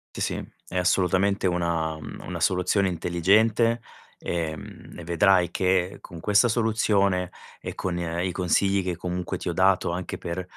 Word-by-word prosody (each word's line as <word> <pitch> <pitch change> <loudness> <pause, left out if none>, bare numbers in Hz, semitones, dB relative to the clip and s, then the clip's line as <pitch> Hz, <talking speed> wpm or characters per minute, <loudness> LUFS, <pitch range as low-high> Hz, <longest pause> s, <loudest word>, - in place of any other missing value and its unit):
Sì, - - -5
sì, - - -3 0.2
è 90 - -4
assolutamente 95 +2 +2
una 85 -3 0
mhmm, - - -9
una - - -5
soluzione 95 +2 +2
intelligente, 105 +7 +2 0.4
ehm, 80 -3 -5
e 85 - -8
vedrai 85 +1 +3
che 95 0 +1
con 85 -3 -10
questa 105 +6 +3
soluzione 105 -5 +1 0.3
e - - -6
con 90 -2 -3
i 85 +2 -2
consigli 95 +2 +1
che 90 -1 -2
comunque 90 0 -3
ti 90 - -4
ho - - -2
dato 95 0 +2
anche 90 +1 -4
per, 85 +2 -4
90 Hz, 155 wpm, -25 LUFS, 85-100 Hz, 0.4 s, vedrai